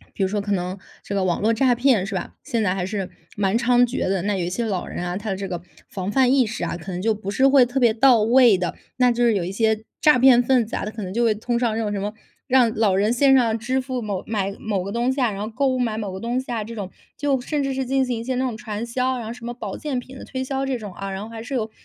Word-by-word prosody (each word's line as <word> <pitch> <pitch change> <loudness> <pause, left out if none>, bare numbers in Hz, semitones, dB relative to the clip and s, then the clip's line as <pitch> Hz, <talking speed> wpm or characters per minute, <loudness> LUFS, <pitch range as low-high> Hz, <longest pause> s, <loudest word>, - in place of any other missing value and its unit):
比 - - -2
如 190 - +2
说 205 +1 -1
可 205 0 -2
能 185 0 -2 0.2
这 200 - -5
个 195 - +1
网 175 -2 0
络 220 +2 +3
诈 250 +1 +3
骗， 240 -6 +2
是 195 - -5
吧， 185 - -4
现 230 -2 -1
在 185 -3 +1
还 185 -2 -2
是 195 -2 -4 0.3
蛮 200 +2 +1
猖 245 0 +3
獗 245 -3 0
的。 190 -2 0
那 205 +1 0
有 180 - -1
一 175 - -3
些 235 +6 -2
老 195 -5 -2
人 175 - -5
啊， 175 0 -3
他 205 +2 -4
的 190 - -1
这 195 0 -5
个 175 -2 -4 0.3
防 190 -1 -4
范 260 +2 +3
意 265 -3 +4
识 215 +1 -4
啊， - - -3
可 180 +2 -8
能 175 - -4
就 220 +1 +2
不 205 -2 -5
是 260 +6 +3
会 270 -2 +6
特 260 +3 -2
别 235 -3 +5
到 235 0 +5
位 235 -2 +5
的， 180 -1 -2 0.2
那 250 -1 +4
就 240 +1 +1
是 230 -2 +4
有 185 - 0
一 180 - -4
些 220 +1 +1 0.2
诈 300 -5 +5
骗 250 -1 +6
分 245 -2 +2
子 225 - -4
啊， - - -3
他 215 - -4
可 220 -1 -7
能 185 -1 -5
就 235 +2 +1
会 220 -2 +3
通 235 +3 -2
上 235 -2 0
这 - - -1
种 205 -1 -2
什 200 - -2
么， 205 +1 -3 0.3
让 255 -4 +3
老 210 -3 +2
人 205 +3 +2
线 270 +2 +4
上 230 -4 +3
支 255 +4 -1
付 255 -1 -4
某 200 -4 -3
买， 200 -3 -2
某 205 -4 -2
个 200 +2 -5
东 240 +2 +1
西 270 - -3
啊， 245 - +3
然 200 -1 -6
后 210 - -3
购 270 +5 0
物 255 -1 0
买 230 -3 0
某 205 -3 -4
个 190 - -6
东 240 +2 -1
西 260 - -9
啊 225 -3 -2
这 230 +2 -8
种， 200 -4 -5 0.3
就 275 -2 0
甚 290 +3 -2
至 275 -1 -1
是 265 0 -1
进 265 +1 +2
行 245 -2 -2
一 - - -6
些 260 +1 -2
那 255 +1 0
种 245 -4 -2
传 220 -1 -5
销， 255 +2 -1
然 230 - -6
后 225 - -4
什 240 -1 -11
么 240 0 -4
保 210 -5 -6
健 290 -5 -3
品 260 +2 -13
的 - - -9
推 260 -1 -4
销 270 +1 -2
这 260 -2 -1
种 210 -4 -8
啊， 195 +1 -5
然 190 +1 -4
后 215 - -7
还 225 -1 -8
是 270 +4 -6
有 220 -3 -1
225 Hz, 345 characters per minute, -23 LUFS, 200-250 Hz, 0.3 s, 会